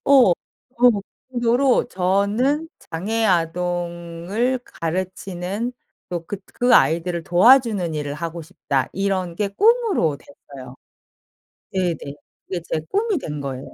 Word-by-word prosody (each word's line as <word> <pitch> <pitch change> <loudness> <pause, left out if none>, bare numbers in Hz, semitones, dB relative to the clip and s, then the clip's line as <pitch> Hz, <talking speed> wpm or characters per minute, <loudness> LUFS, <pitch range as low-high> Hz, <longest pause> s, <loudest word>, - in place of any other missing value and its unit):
어 265 -9 +6 0.5
뭐 240 -5 +5 0.3
그 245 -2 -4
정도로 245 +2 +3
저는 205 - +1
'장애 215 +7 -2
아동을 175 +5 -1
가르치는 185 +5 -4 0.4
또 170 -2 -4
그 205 - -4 0.2
그 245 0 +4
아이들을 170 +4 +3
도와주는 205 -2 +4
일을 145 -1 -3
하고 165 +2 -5
싶다.' 150 -5 -2
이런 190 -3 -1
게 205 +1 0
꿈으로 415 - +2
됐어요. 135 - -13 1.0
네네. 170 -6 -2 0.3
그게 180 -2 -3
제 160 - +1
꿈이 420 -1 +1
된 150 - -5
거예요. 135 -1 -6
185 Hz, 235 characters per minute, -22 LUFS, 170-240 Hz, 1.0 s, 어